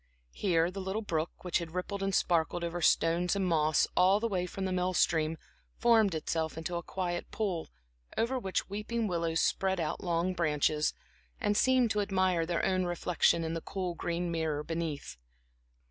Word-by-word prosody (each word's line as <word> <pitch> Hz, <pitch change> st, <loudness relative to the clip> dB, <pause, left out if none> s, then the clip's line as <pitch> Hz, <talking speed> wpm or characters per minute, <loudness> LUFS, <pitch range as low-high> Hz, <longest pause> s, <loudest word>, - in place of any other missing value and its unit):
Here 170 Hz, -3 st, +1 dB
the 195 Hz, +1 st, -5 dB
little 190 Hz, +4 st, -3 dB
brook, 165 Hz, -4 st, -3 dB
which 180 Hz, -2 st, +1 dB
had 170 Hz, 0 st, -7 dB
rippled 195 Hz, +2 st, -3 dB
and 195 Hz, -1 st, 0 dB
sparkled 170 Hz, 0 st, +1 dB
over 170 Hz, +1 st, -3 dB
stones 170 Hz, +3 st, +3 dB
and 195 Hz, -1 st, 0 dB
moss 155 Hz, -3 st, +3 dB
all 190 Hz, +3 st, +5 dB
the 230 Hz, -, 0 dB
way 180 Hz, -4 st, -1 dB
from 190 Hz, +2 st, -4 dB
the 190 Hz, -, -1 dB
mill 185 Hz, 0 st, 0 dB
stream, 160 Hz, -1 st, +2 dB, 0.4 s
formed 220 Hz, -6 st, +4 dB
itself 160 Hz, 0 st, -2 dB
into 165 Hz, +2 st, -3 dB
a -, -, -3 dB
quiet 175 Hz, 0 st, -3 dB
pool, 190 Hz, -7 st, -2 dB, 0.5 s
over 255 Hz, +3 st, +1 dB
which 190 Hz, -5 st, -2 dB
weeping 215 Hz, +3 st, -2 dB
willows 170 Hz, -4 st, 0 dB
spread 190 Hz, -1 st, +1 dB
out 160 Hz, +3 st, -2 dB
long 175 Hz, +1 st, 0 dB
branches, 155 Hz, -2 st, +1 dB, 0.4 s
and 205 Hz, -, +1 dB
seemed 255 Hz, 0 st, +3 dB
to 210 Hz, -, +1 dB
admire 185 Hz, -4 st, +1 dB
their 170 Hz, -1 st, 0 dB
own 185 Hz, -1 st, +1 dB
reflection 175 Hz, -1 st, +2 dB
in 160 Hz, 0 st, -2 dB
the 165 Hz, -, -3 dB
cool 185 Hz, -1 st, -3 dB
green 170 Hz, +1 st, -2 dB
mirror 160 Hz, -3 st, -1 dB
beneath. 160 Hz, -, -4 dB
175 Hz, 175 wpm, -31 LUFS, 165-195 Hz, 0.5 s, all